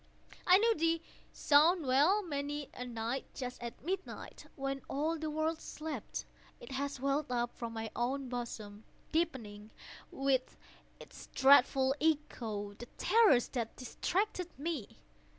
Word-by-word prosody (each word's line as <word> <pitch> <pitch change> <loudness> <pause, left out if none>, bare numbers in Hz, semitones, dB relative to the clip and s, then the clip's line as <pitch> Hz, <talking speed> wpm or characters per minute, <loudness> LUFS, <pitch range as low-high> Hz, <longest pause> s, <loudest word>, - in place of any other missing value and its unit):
I 365 +1 +9
knew 455 +3 +4
the 330 -3 +1 0.3
sound 310 +3 +4
well. 295 +11 +4
Many 290 -3 -3
a 250 - -6
night, 235 +2 -3
just 250 -2 -5
at 235 +2 -7
midnight, 380 +2 -5
when 275 0 -3
all 305 +4 0
the 315 0 -2
world 315 +1 -1
slept, 315 0 -5 0.3
it - - -11
has 275 0 -3
welled 275 +1 0
up 240 -1 -1
from 235 -1 -5
my 225 -1 -4
own 260 +3 -1
bosom, 225 -4 -6 0.3
deepening, 230 -11 -2 0.4
with 270 -1 0 0.4
its - - -12
dreadful 270 -1 +6
echo, 230 -10 -1
the 240 +4 -10
terrors 390 - +5
that 235 -3 -3
distracted 360 - -1
me. 290 -6 -4
275 Hz, 135 wpm, -33 LUFS, 240-320 Hz, 0.4 s, I